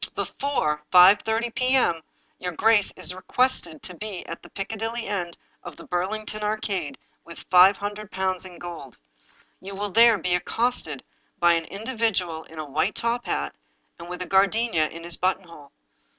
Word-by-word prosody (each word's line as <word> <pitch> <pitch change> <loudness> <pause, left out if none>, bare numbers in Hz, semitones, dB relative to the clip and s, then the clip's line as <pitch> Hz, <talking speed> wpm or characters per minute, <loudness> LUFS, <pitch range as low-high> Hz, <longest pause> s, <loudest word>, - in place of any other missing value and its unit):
" - - -28
Before 270 - -1
5 185 +3 +8
130 225 +3 -2
p.m. 255 -9 +2 0.4
your 180 -1 -4
grace 210 +4 +3
is - - -1
requested 185 - -1
to 180 - -6
be 200 0 -6
at 165 - -7
the - - -15
Piccadilly 225 +3 -4
end 180 -4 -3 0.2
of - - -9
the - - -11
Burlington 215 +4 -3
Arcade 205 -9 -2 0.3
with 170 - -12
five 185 +2 +7
hundred 205 0 -5
pounds 190 -1 -2
in 180 -2 -11
gold. 165 -8 -9 0.6
You 195 +1 -8
will 205 +1 -3
there 230 +1 +6
be 180 -1 -1
accosted 180 - -1 0.3
by 175 0 +4
an 165 -1 0
in 195 +5 -9
dividual 200 -10 -1
in 160 - -15
a 155 - -4
v/hite 155 +8 -1
top 235 +1 -2
hat, - - -2 0.5
and 170 +1 -9
with 180 0 -5
a - - -10
gardenia 195 -3 +2
in 165 +1 -10
his 170 -1 +2
buttonhole. 175 -6 -3
190 Hz, 170 wpm, -25 LUFS, 170-220 Hz, 0.6 s, 5